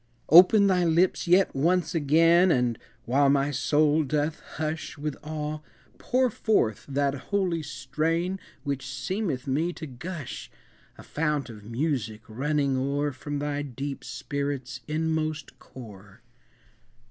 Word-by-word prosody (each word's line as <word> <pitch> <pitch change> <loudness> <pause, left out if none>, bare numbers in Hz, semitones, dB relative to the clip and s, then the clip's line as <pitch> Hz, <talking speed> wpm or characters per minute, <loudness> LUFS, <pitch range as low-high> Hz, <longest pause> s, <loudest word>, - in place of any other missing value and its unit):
Open 185 +6 +8
thy 185 -2 +3
lips 175 +2 +2
yet 185 +2 +4
once 175 +6 +1
again 165 +4 +4
And, 125 -5 +1 0.3
while 140 +3 +3
my 140 +1 +2
soul 150 +2 +2
doth 150 +2 -1 0.2
hush 160 +1 -4
With 150 -1 -3
awe, 155 0 -4 0.4
pour 255 -1 +1
forth 160 - 0
that 140 0 0 0.2
holy 185 -5 0
strain 155 +7 -2 0.2
Which 140 -1 -3
seemeth 130 +2 -3
me 150 +6 0
to 160 - -7
gush, 155 +2 -7 0.5
A - - -12
fount 150 -4 -2
of 105 -2 -12
music, 115 -3 -2
running 140 +4 0
o'er 140 +2 0
From 145 +2 -5
thy 145 0 -2
deep 140 0 -5
spirit's 140 -4 -4
inmost 155 -1 -2
core! 105 -3 -13
145 Hz, 125 wpm, -26 LUFS, 135-165 Hz, 0.5 s, Open